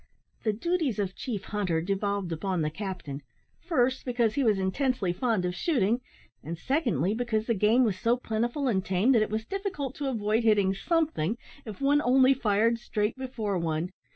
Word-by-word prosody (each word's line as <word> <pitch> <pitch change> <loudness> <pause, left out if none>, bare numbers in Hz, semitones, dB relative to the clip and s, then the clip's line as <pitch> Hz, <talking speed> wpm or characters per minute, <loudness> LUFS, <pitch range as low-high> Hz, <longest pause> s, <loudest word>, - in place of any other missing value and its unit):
The 220 - +2
duties 310 - -1
of 195 -2 -2
chief 225 -7 -4
hunter 195 -6 -1
devolved 195 +1 -1
upon 175 +1 -1
the 155 - -1
captain, 180 -7 -5 0.4
first, 265 -6 +1
because 240 -3 +1
he 280 - +1
was 215 -4 +3
intensely 195 0 0
fond 220 -2 0
of 180 - -1
shooting; 235 - +1 0.4
and, 165 +3 -5
secondly, 210 - 0
because 225 -2 -1
game 225 +2 +3
was 205 -6 0
so 235 +2 +2
plentiful 240 +4 -1
and 190 -6 +1
tame, 190 +7 +2
that 235 -4 +5
it 215 - 0
was 220 +1 -2
difficult 375 - -3
to 285 -2 -2
avoid 220 -1 0
hitting 205 -4 +3
something, 240 - 0 0.3
if 215 +2 -8
one 285 +2 +4
only 260 0 +5
fired 230 -1 +2
straight 215 -2 -1
before 230 -7 -3
one. 165 +2 -2
220 Hz, 175 wpm, -28 LUFS, 190-255 Hz, 0.4 s, that